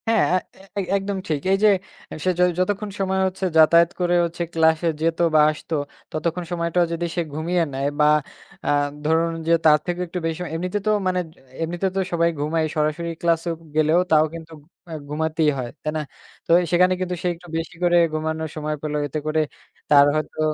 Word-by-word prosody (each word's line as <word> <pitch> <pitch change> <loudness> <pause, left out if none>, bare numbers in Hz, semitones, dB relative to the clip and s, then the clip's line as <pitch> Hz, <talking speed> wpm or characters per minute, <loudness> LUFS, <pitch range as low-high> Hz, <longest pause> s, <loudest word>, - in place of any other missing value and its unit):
হ্যাঁ 225 -5 +3 0.2
এ - - -16 0.2
এই 195 - -2
একদম 195 0 -3
ঠিক। 150 -3 -1
এই 195 - +4
যে - - +7 0.4
অ্যা - - -7
সে - - +3
য - - +4 0.2
যতক্ষণ 205 +3 -1
সময় 190 0 0
হচ্ছে 190 0 -4
যাতায়াত 170 +1 +6
করে 175 0 +2
হচ্ছে 170 +1 -6
ক্লাসে 160 0 +3
যেত 165 +1 +1 0.2
বা - - +7
আসতো 155 +1 -5 0.4
ততক্ষণ 170 +3 -2
সময়টাও 170 0 +1
যদি 170 +1 -2
সে 175 - +1
ঘুমিয়ে 170 +3 0
নেয় 135 +1 -1
বা 150 - +5 0.6
আ - - 0 0.4
ধরুন 165 +2 +2 0.2
যে - - +2
তার 150 -1 +7
থেকেও 175 0 -2
একটু 180 +2 -4
বেশি 165 0 -1
সময় 180 -3 -5
এমনিতে 180 +4 -2
তো - - +4 0.2
মানে 185 0 +1 0.4
এমনিতে 175 +3 -1
তো - - +1
সবাই 170 -1 +2
ঘুমায় 160 +2 0
সরাসরি 155 +2 -1
ক্লাসে 170 0 +1 0.3
গেলেও 155 +2 +4
তাও 155 -1 +6
কিন্তু 165 -1 -9 0.4
এ - - -5 0.2
ঘুমাতেই 160 +1 +1
হয়, 125 -2 -4
তাই 155 - -1
না? - - -1 0.4
তো - - -3 0.2
সেখানে 180 +1 +4
কিন্তু 180 -1 -2
সে - - +1
একটু 175 +1 -16
বেশি 165 +2 -5
করে 175 0 +3 0.2
ঘুমানোর 160 0 -2
সময় 155 0 -2
পেল 150 -1 -4
এতে 150 +2 -3
করে 155 +1 +1 0.5
তার 145 -1 +7
হয়তো 155 0 -3
165 Hz, 195 wpm, -22 LUFS, 155-180 Hz, 0.6 s, যে